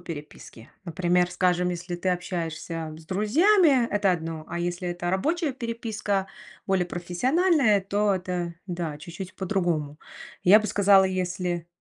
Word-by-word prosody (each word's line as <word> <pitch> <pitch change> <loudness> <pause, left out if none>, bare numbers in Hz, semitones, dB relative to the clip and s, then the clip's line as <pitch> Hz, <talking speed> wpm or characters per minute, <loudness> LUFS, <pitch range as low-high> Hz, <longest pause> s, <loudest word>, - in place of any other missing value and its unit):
переписки. 150 -8 -10
Например, 175 +1 +1
скажем, 180 -1 +1
если 175 0 -5
ты 185 +2 -2
общаешься 165 -2 -4
с 160 - -14
друзьями, 270 - +4
это 200 -2 +2
одно, 165 -2 -4
а 170 +1 -4
если 175 +1 -3
это 175 0 -3
рабочая 305 - 0
переписка, 220 -5 -3 0.4
более 190 -2 +1
профессиональная, 225 - +2
то 200 +1 +1
это, 180 -2 -3
да, 170 -4 -4
чуть-чуть 170 +4 -8
по-другому. 175 -7 -1 0.5
Я 205 +4 +8
бы 215 - -3
сказала, 195 -1 +5
если 180 -2 -2
180 Hz, 130 wpm, -26 LUFS, 175-205 Hz, 0.5 s, Я